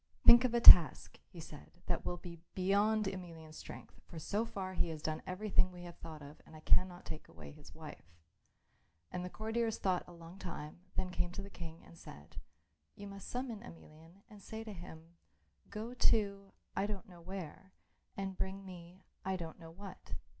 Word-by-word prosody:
"Think 240 +2 +10
of 240 -1 +1
a - - +4
task," 175 -8 +10
he - - -11
said, - - -11
"that - - -1
will 175 - -2
be 170 -1 -9 0.2
beyond 205 +3 +3
Emelian's 170 -5 -6
strength, - - -10
for 170 - -10
so 210 +7 -1
far 190 -4 -5
he - - +1
has 160 -1 -5
done 155 0 -2
everything 185 0 +2
we 180 -1 -10
have 175 -1 -10
thought 155 -2 -8
of 145 +2 -12
and - - -15
I 155 - -11
cannot 180 +2 +3
take 155 - -7
away 75 -4 -11
his - - -14
wife." 85 0 -11 0.9
And 180 - -3
the 180 - -4
courtiers 225 +2 -1
thought 185 -2 +1
for - - -15
a 175 - -11
long 170 +3 -12
time, 160 -4 -6 0.2
then 185 - -1
came 175 -1 -1
to 200 - -5
the 200 - -10
King 165 -2 -8
and 170 - -15
said, 75 +2 -12 0.6
"You 205 - -9
must 200 -1 -8
summon 245 -4 -3
Emelian 165 -2 -14
and 210 -3 -14
say 220 +3 -6
to 220 -2 -7
him, 170 -1 -11 0.5
'Go 225 +3 -5
to 200 -5 +2 0.2
I 200 - +1
don't 210 +1 -5
know 175 -3 -13
where, 190 +1 -7 0.5
and 195 -1 -3
bring 195 +1 -3
me 180 0 -11 0.2
I 190 0 0
don't 165 -2 -6
know 165 -1 -10
what. 195 +4 -9
185 Hz, 195 wpm, -35 LUFS, 165-200 Hz, 0.9 s, Think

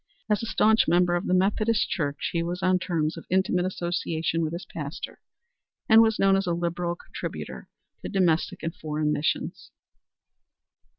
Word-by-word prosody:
As 210 - +2
a 230 - -4
staunch 220 0 +3
member 175 +1 +3
of 175 +2 -1
the - - +1
Methodist 210 +4 +2
Church, 145 -5 -2
he 170 - +1
was 175 +1 -3
on 185 0 +3
terms 165 -3 -1
of 165 - -9
intimate 185 -1 +2
association 170 -2 -2
with 155 -1 -1
his 170 +2 -6
pastor, 150 -1 -7 0.7
and 220 0 +8
was 220 -1 +3
known 195 0 +4
as 195 -1 0
a 175 - +1
liberal 170 0 -2
contributor - - -7 0.3
to - - -5
domestic 175 -5 +1
and 165 0 -2
foreign 150 -1 -1
missions. 150 - -2
175 Hz, 165 wpm, -26 LUFS, 165-190 Hz, 0.7 s, and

